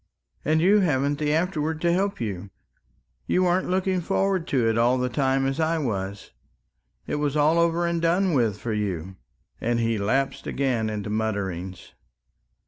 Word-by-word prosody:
And 155 +1 +2
you 200 +5 +5
hadn't 145 -5 +1
the 150 -1 0
afterwards 160 -1 -1
to 170 0 +2
help 195 +2 0
you 100 -4 -4 0.8
you 185 - +2
weren't 180 +1 +1
looking 185 0 0
forward 195 0 0
to 125 -5 +1
it 115 - +2
all 120 +3 +3
the 125 0 -1
time 135 +1 +1
as 135 +3 -1
I 165 +1 +1
was... 100 -8 -4 0.7
it - - -2
was 145 0 -1
all 155 +3 +3
over 170 +1 +2
and 170 -1 -1
done 175 +2 +2
with 115 -7 +1
for 115 +1 -4
you 95 -3 -3 0.2
..." - - -40
and 120 0 0
he 115 -2 0
lapsed 135 +7 -1
again 125 -5 0
into 105 -1 -4
mutterings. 95 -4 -3
135 Hz, 170 wpm, -25 LUFS, 110-170 Hz, 0.8 s, you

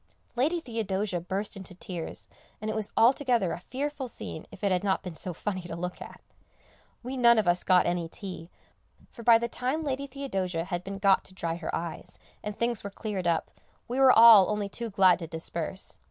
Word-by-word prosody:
Lady 300 +8 +1
Theodosia 210 - -2
burst 195 +4 -4
into 190 -2 -9
tears, 175 -2 -6 0.3
and 215 +1 -3
it - - -4
was 215 -2 -1
altogether 240 -6 +3
a - - -5
fearful 270 +6 -4
scene 160 -8 -7
if - - -13
it 200 - +2
had 180 0 +1
not 195 -1 0
been 180 -2 -6
so 180 +3 -2
funny 185 +2 -4
to 175 -1 -7
look 180 +1 -5
at. - - -10 0.8
We 255 +2 -5
none 235 -2 +6
of 215 -4 +2
us 175 0 +2
got 185 -1 +4
any 175 -1 -1
tea, 180 -3 -8 0.6
for - - -11
by 230 0 +7
the 235 +1 -2
time 260 +7 -2
Lady 280 -1 -2
Theodosia 195 -11 -3
had 175 0 -4
been 195 +1 -6
got 195 -1 +4
to 185 - -10
dry 165 -2 -2
her 175 - -4
eyes, 165 -1 -6 0.3
and 210 -1 -5
things 235 -1 -1
were 200 - -4
cleared 200 -3 -4
up, 165 -2 0 0.4
we 250 +3 -2
were 265 -1 +8
all 225 -5 +9
only 210 -1 -1
too 230 +3 -5
glad 190 -3 +5
to 165 - -6
disperse. 165 +3 -5
200 Hz, 205 wpm, -28 LUFS, 180-235 Hz, 0.8 s, all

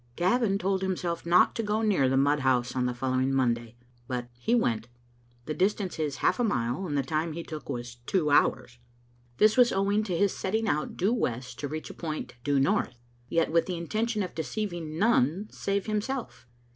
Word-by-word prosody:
"^, - - -34
Gavin 195 - +2
told 190 0 0
himself 180 -3 -2
not 175 +1 +5
to - - -2
go 215 +1 0
near 185 -12 +3
the 135 - +2
mud 145 +2 +3
house 125 -2 +1
on 125 -1 +1
the 125 - -1
following 130 +1 0
Monday; 120 -3 0 0.3
but 125 -2 -3
he 120 - 0
went. 115 - 0 0.6
The 155 - -3
distance 190 +2 0
is 150 -3 -1
half - - +3
a - - +2
mile, 130 - -1
and 145 -3 -1
the 140 - +1
time 155 +4 -1
he 170 +1 -5
took 155 -2 -8
was 120 0 -5
two 160 -6 +1
hours. 125 -4 +2 0.6
This 215 +3 +4
was 245 -1 +6
owing 200 +2 +2
to 180 -5 -1
his 200 +2 +2
setting 220 +3 -1
out 150 -3 -1
due 195 +6 +2
west 125 - -2
to 145 - -3
reach 155 +2 -6
a - - -10
point 155 -3 -5
due 145 -1 +2
north; 135 -2 +1 0.3
yet 165 -1 +1
with 165 0 +2
the 180 -2 -2
intention 215 +5 -1
of 180 - -6
deceiving 165 0 -4
none 195 - +2
save 200 0 -2
himself. 215 - -3
165 Hz, 200 wpm, -28 LUFS, 130-200 Hz, 0.6 s, was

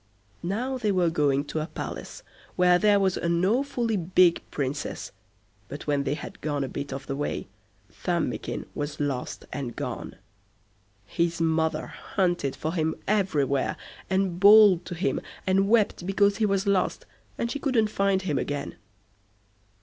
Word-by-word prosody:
Now 245 +9 -2
they 215 -4 +1
were 180 -3 +2
going 145 -3 +1
to 155 - -3
a 155 - -3
palace - - -7 0.3
where 180 -1 +5
there 205 0 +4
was 190 -2 +1
an 170 +1 +1
awfully 240 0 +1
big 175 0 +3
Princess, 140 0 -4 0.6
but 145 - -8
when 145 -2 0
they 145 - 0
had 150 - -9
gone 145 -2 -1
a - - -2
bit 140 +2 -5
of 135 0 -5
the 135 - -3
way, 145 +1 -3 0.5
Thumbikin 175 -3 -2
was 145 0 -4
lost 140 -4 -3
and 130 -4 -4
gone. - - -5 0.9
His 170 +10 -1
mother 160 -1 +1
hunted 175 -8 -1
for 160 +1 -3
him 160 -2 0
everywhere, 150 -10 +1 0.3
and 190 -2 0
bawled 205 -3 +7
to 175 - -5
him, 180 +5 -1 0.2
and 195 +1 +2
wept 210 -5 +2
because 200 +1 +3
he 220 -2 +2
was 195 0 0
lost, 200 -2 +1 0.3
and 235 - -2
she 285 - -3
couldn't 230 -7 +1
find 195 -2 +1
him 155 -6 0
again. 145 -1 -4
175 Hz, 155 wpm, -26 LUFS, 145-200 Hz, 0.9 s, bawled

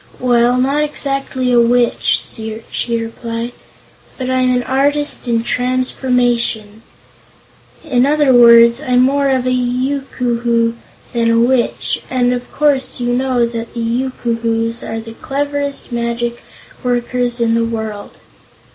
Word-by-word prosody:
"Well, 245 0 +3
not 275 +4 +1
exactly 275 -3 -2
a 240 - +5
Witch," 240 0 +2 0.5
she 235 -1 -1
replied, 230 +1 -5 0.7
"but 255 0 -3
I'm 255 -1 +2
an 250 0 +1
Artist 285 +1 -1
in 230 -1 +1
Transformations. 245 -4 0 1.0
In 260 -4 +2
other 295 -2 +3
words, 235 +1 +7
I'm 250 -4 +2
more 275 +1 +2
of 260 -2 +1
a 255 - +1
Yookoohoo 245 -2 0 0.4
than 230 -1 +1
a 230 0 +3
Witch, 245 +1 +1
and 250 -1 +1
of 245 0 -5
course 285 -4 0
you 245 0 -1
know 250 -1 +1
that 230 0 -6
the - - -4
Yookoohoos 230 -1 -2
are 225 - -5
the 225 0 -9
cleverest 285 +2 -3
magic 235 0 -2 0.4
workers 245 0 0
in 230 -1 +2
the 230 0 +2
world." 220 -3 -5
245 Hz, 130 wpm, -16 LUFS, 235-260 Hz, 1.0 s, words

